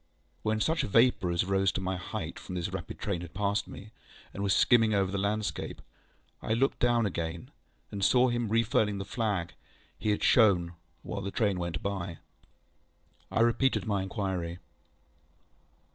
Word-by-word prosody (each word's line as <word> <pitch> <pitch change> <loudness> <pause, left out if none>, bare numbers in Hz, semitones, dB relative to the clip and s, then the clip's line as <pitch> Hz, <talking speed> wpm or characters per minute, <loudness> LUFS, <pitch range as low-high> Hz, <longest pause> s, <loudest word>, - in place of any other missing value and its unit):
When 110 0 0
such 160 +8 +1
vapour 115 -3 +3
as 85 +1 +1
rose 95 0 +2
to - - -2
my 95 0 -2
height 95 -2 -5
from 90 - -7
this 85 -2 -3
rapid - - -5
train 100 -5 -3
had 85 -1 -10
passed 100 +2 0
me, 105 +2 -10 0.4
and 100 - -5
was 100 -1 +1
skimming 115 0 +4
away 100 - +3
over 95 - -3
the 100 - -1
landscape, 105 +2 -2 0.6
I 110 - 0
looked 135 +4 +1
down 120 -2 +3
again, 85 -3 -4 0.4
and 100 -1 -4
saw 125 +6 +5
him 120 -2 -1
refurling 110 -2 +2
the 100 - -4
flag 100 -7 -2 0.5
he 110 - -1
had 105 - 0
shown 90 -7 +4 0.3
while 100 - -4
the 100 - -3
train 100 -3 0
went 85 -2 -4
by. 95 -4 -3 1.1
I - - +1
repeated 120 +3 +2
my 100 -3 0
inquiry. 95 -4 -3
100 Hz, 165 wpm, -29 LUFS, 95-110 Hz, 1.1 s, saw